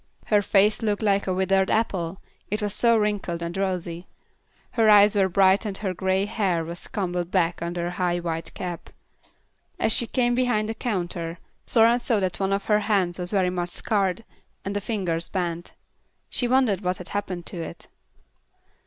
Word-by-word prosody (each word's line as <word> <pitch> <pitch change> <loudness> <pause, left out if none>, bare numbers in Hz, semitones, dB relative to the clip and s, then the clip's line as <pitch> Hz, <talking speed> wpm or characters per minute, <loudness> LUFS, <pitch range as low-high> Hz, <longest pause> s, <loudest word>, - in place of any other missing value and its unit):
Her 210 -1 +3
face 205 +2 +3
looked 210 -1 -1
like 200 -2 +2
a - - +1
withered 190 +1 +2
apple, 190 -5 -1 0.3
it 210 - -1
was 205 -1 -1
so 235 +1 +3
wrinkled 205 -5 -1
and 170 +1 -4
rosy; 180 -3 -2 0.6
her 225 -2 +3
eyes 205 0 +7
were 195 -2 +3
bright 190 +1 +4
and 205 -3 -3
her 195 -3 -2
grey 190 +2 0
hair 190 -6 0
was 170 +1 -5
combed 180 -3 -2
back 175 -3 +1
under 170 0 -3
a 175 - -2
high 180 -1 0
white 165 -1 -4
cap. 175 -2 -6 0.9
As 220 - +1
she 235 - +1
came 245 0 +1
behind 240 -4 +1
the - - -1
counter, 175 -7 -3 0.3
Florence 235 +1 +4
saw 225 -4 +2
that 185 -2 -2
one 195 0 0
of 195 0 -1
her 210 -1 +3
hands 190 -5 0
was 180 0 -3
very 185 -3 +1
much 175 -1 -2
scarred, 200 +2 -1 0.4
and 200 +1 -3
the 205 - -1
fingers 180 -6 -2
bent. 175 -2 -3 0.6
She 245 - +1
wondered 245 -6 +2
what 180 -1 -1
had 180 - -9
happened 185 -4 -4
to 175 - -4
it. 165 - -8
195 Hz, 180 wpm, -25 LUFS, 175-210 Hz, 0.9 s, eyes